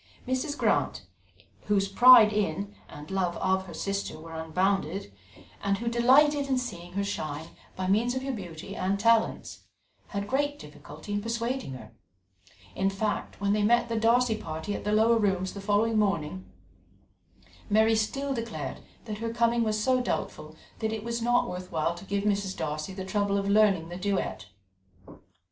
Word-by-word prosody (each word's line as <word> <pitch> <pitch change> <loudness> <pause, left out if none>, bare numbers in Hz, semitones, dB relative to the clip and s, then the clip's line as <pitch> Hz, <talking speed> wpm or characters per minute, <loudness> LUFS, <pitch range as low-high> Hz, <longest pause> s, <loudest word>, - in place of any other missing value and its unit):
Mrs. 260 +3 -1
Grant, - - 0 0.6
whose 200 -1 +2
pride 220 +1 +8
in, 200 0 -1 0.2
and 150 +4 -10
love 185 -3 0
of, 190 0 0
her 170 - -9
sister 195 -3 -3
were 165 +1 -10
unbounded, 165 - -1 0.5
and 200 0 +1
who 235 - -5
delighted 275 +5 +4
in 265 -1 +1
seeing 175 -9 -6
her 200 +1 -1
shine 155 -5 -4 0.3
by 185 - -3
means 225 +6 +2
of 260 - -2
her 270 - -2
beauty 190 -4 -7
and 195 +2 -1
talents, 230 +1 +2 0.5
had 200 -1 -4
great 285 +4 0
difficulty 150 - -10
in 205 - 0
persuading 230 - -3
her; 110 -4 -10 0.8
in 195 0 +1
fact, 205 +2 -3
when 200 0 +1
they 210 - +1
met 235 +3 +3
the 230 - -1
Darcy 230 +1 +3
party 160 +2 -5
at - - -5
the 210 - 0
Lower 225 +2 +4
Rooms 190 -3 0
the 200 - -7
following 215 +2 +2
morning, 155 - -1 1.2
Mary 220 +2 +4
still 270 +6 -1
declared 230 -2 -5 0.3
that 210 -2 -5
her 230 0 -3
coming 235 0 +2
was 215 -1 0
so 255 +3 +2
doubtful - - -4 0.2
that 220 -1 -1
it 220 -1 -4
was 235 0 -3
not 240 +1 +2
worth 180 0 -6
while 160 +1 0
to 175 +3 -11
give 200 +1 -1
Mrs. 200 -2 -1
Darcy 155 +2 -3
the 190 0 -6
trouble 200 +1 0
of 200 0 -1
learning 200 -5 +3
the 175 - -6
duet. 185 - -2
205 Hz, 170 wpm, -28 LUFS, 185-230 Hz, 1.2 s, pride